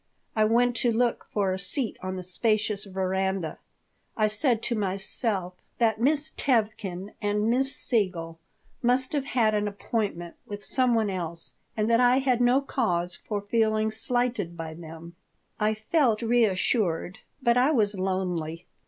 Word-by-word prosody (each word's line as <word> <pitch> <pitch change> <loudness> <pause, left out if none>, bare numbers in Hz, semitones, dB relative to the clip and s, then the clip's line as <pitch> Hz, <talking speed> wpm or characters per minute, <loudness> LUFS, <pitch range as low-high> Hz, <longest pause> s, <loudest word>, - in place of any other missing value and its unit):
I 215 -1 +4
went 240 +2 +3
to 240 - +2
look 235 +1 0
for 195 -3 -1
a 190 - -4
seat 230 +3 0
on 185 0 -4
the 185 - -5
spacious 210 +2 0
veranda. 190 -2 -2 0.6
I 215 -1 +3
said 225 +2 +3
to 240 - 0
myself 195 -1 0 0.2
that 225 -2 +1
Miss 295 +3 +2
Tevkin 210 -6 -1
and 210 +2 +1
Miss 270 +2 +1
Siegel 175 -8 -1 0.4
must 255 +3 +1
have 285 -2 0
had 225 -5 +2
an 210 0 0
appointment 200 -4 -3
with 205 0 -7
some 255 -2 +3
one 220 -3 +1
else 170 -3 -1 0.2
and 215 0 +1
that 230 0 +4
I 250 +1 +5
had 255 -3 +1
no 245 +3 +4
cause 180 -11 -1
for 205 -2 -4
feeling 215 0 +1
slighted 225 -6 -1
by 160 -1 -5
them 165 +1 -10 0.4
I 215 +1 +1
felt 235 -1 +1
reassured, 210 -5 +1 0.2
but 235 -2 +4
I 250 +3 +4
was 215 -9 +2
lonely. 180 -3 -2
215 Hz, 155 wpm, -27 LUFS, 185-240 Hz, 0.6 s, I